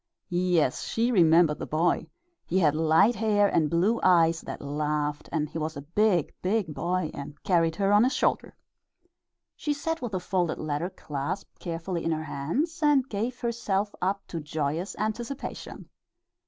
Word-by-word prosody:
Yes, 175 Hz, -6 st, +2 dB
she 235 Hz, +2 st, 0 dB
remembered 165 Hz, -5 st, +4 dB
the -, -, -5 dB
boy 165 Hz, +3 st, +1 dB, 0.4 s
he 180 Hz, -, 0 dB
had 155 Hz, -6 st, +4 dB
light 160 Hz, +8 st, +4 dB
hair, 210 Hz, -2 st, +2 dB
and 155 Hz, -6 st, +2 dB
blue 190 Hz, +9 st, +2 dB
eyes 165 Hz, -2 st, +4 dB
that -, -, -7 dB
laughed, 150 Hz, 0 st, -2 dB
and 155 Hz, -2 st, 0 dB
he 160 Hz, -, -6 dB
was 155 Hz, -1 st, -3 dB
a 140 Hz, -, -7 dB
big, 180 Hz, +1 st, +1 dB
big 190 Hz, -4 st, 0 dB
boy 175 Hz, +1 st, -1 dB
and 140 Hz, +1 st, -7 dB
carried 165 Hz, -4 st, +2 dB
her 195 Hz, +2 st, +2 dB
on 205 Hz, +2 st, +6 dB
his 260 Hz, +3 st, +1 dB
shoulder. -, -, 0 dB, 1.0 s
She 295 Hz, -, -1 dB
sat 325 Hz, +2 st, -3 dB
with 240 Hz, -4 st, -4 dB
the 185 Hz, -, 0 dB
folded 180 Hz, -2 st, -1 dB
letter 155 Hz, +3 st, -2 dB
clasped 145 Hz, +2 st, -5 dB
carefully 170 Hz, 0 st, -4 dB
in 165 Hz, -, 0 dB
her 155 Hz, 0 st, -1 dB
hands 205 Hz, -, -2 dB
and 290 Hz, -4 st, +4 dB
gave 230 Hz, +4 st, -3 dB
herself 210 Hz, -4 st, -1 dB
up 195 Hz, +2 st, -1 dB
to 170 Hz, -, -4 dB
joyous 155 Hz, +4 st, -3 dB
anticipation. 230 Hz, +5 st, -5 dB
175 Hz, 165 wpm, -27 LUFS, 155-210 Hz, 1.0 s, on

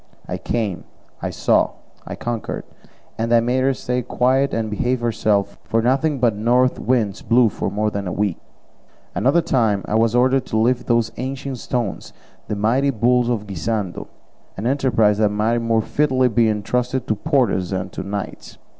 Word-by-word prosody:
I -, -, -4 dB
came, 110 Hz, -6 st, -2 dB, 0.4 s
I -, -, -2 dB
saw, -, -, +2 dB, 0.3 s
I -, -, -5 dB
conquered, 120 Hz, -3 st, -4 dB, 0.6 s
and 115 Hz, +1 st, -1 dB
I 120 Hz, -, +6 dB
made 120 Hz, +3 st, +1 dB
her 135 Hz, +1 st, +2 dB
stay 125 Hz, 0 st, -2 dB
quiet 130 Hz, +3 st, +1 dB
and 115 Hz, -1 st, -1 dB
behave 120 Hz, +4 st, -1 dB
herself, 110 Hz, -3 st, 0 dB
for 115 Hz, -, 0 dB
nothing 135 Hz, +5 st, +1 dB
but 120 Hz, -4 st, +2 dB
north 125 Hz, +4 st, +2 dB
winds 115 Hz, -6 st, 0 dB
blew 120 Hz, -1 st, +4 dB
for -, -, -3 dB
more 105 Hz, +2 st, -1 dB
than 100 Hz, -2 st, -4 dB
a -, -, -2 dB
week. 100 Hz, -2 st, -1 dB, 0.7 s
Another 145 Hz, +7 st, +2 dB
time 110 Hz, -9 st, +1 dB
I -, -, -4 dB
was 115 Hz, +1 st, +2 dB
ordered 130 Hz, +1 st, +3 dB
to 110 Hz, -, -1 dB
lift 120 Hz, +3 st, +1 dB
those 115 Hz, -2 st, +2 dB
ancient 135 Hz, 0 st, -4 dB
stones, 120 Hz, -5 st, -3 dB, 0.3 s
the 105 Hz, -, -2 dB
mighty 120 Hz, +7 st, +2 dB
bulls 120 Hz, 0 st, +2 dB
of 110 Hz, -4 st, -1 dB
Guisando, 100 Hz, 0 st, -3 dB, 0.5 s
an 100 Hz, -, -4 dB
enterprise 120 Hz, -6 st, +2 dB
that 105 Hz, -1 st, +4 dB
might 110 Hz, +3 st, +1 dB
more 115 Hz, -1 st, +1 dB
fitly 130 Hz, 0 st, +2 dB
be 115 Hz, -1 st, +3 dB
entrusted 125 Hz, +4 st, -1 dB
to -, -, +1 dB
porters 115 Hz, -, +1 dB
than 95 Hz, -1 st, -3 dB
to -, -, -5 dB
knights. 100 Hz, 0 st, -6 dB
115 Hz, 170 wpm, -21 LUFS, 105-125 Hz, 0.7 s, I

